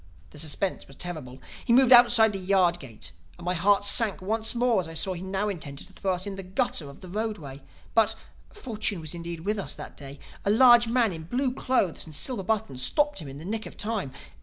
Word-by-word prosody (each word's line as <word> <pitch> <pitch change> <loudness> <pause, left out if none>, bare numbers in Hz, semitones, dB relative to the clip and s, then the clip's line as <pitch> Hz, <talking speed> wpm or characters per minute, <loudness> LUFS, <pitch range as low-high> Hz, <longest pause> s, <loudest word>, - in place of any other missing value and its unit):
The - - -7
suspense 160 +5 -2
was 135 - -14
terrible. 150 -7 -7 0.3
He 235 - +2
moved 260 0 +5
outside 240 -3 +7
the 195 - -3
yard 185 -2 +2
gate 120 -8 -8 0.3
and - - -11
my 180 - +1
heart 200 +3 +3
sank 210 0 +2
once 220 +4 -1
more 235 -4 +2
as 170 - -7
I 165 - -9
saw 185 +5 -1
that 185 - -4
he - - -8
now 190 +2 -2
intended 150 -8 -6
to - - -15
throw 190 -1 -1
us 180 +1 -3
in 200 -1 -5
the - - -4
gutter 185 - -2
of 140 - -14
the 185 - -10
roadway. 185 -9 -5 0.3
But 220 -1 +3 0.4
(fortune 220 - -2
was 155 -2 -6
indeed 170 -1 -6
with 205 +4 -1
us - - -3
that - - -9
day), 140 0 -10 0.3
a - - 0
large 240 +1 +7
man 230 -4 +2
in 160 -1 -8
blue 255 +7 -1
clothes 250 -10 0
and 155 - -9
silver 240 - -1
buttons 200 -10 -2
stopped 295 - +1
him 150 - -7
in 135 +1 -9
the 155 - -10
nick 220 +3 -3
of - - -12
time. 210 -9 -2
195 Hz, 235 wpm, -27 LUFS, 165-225 Hz, 0.4 s, outside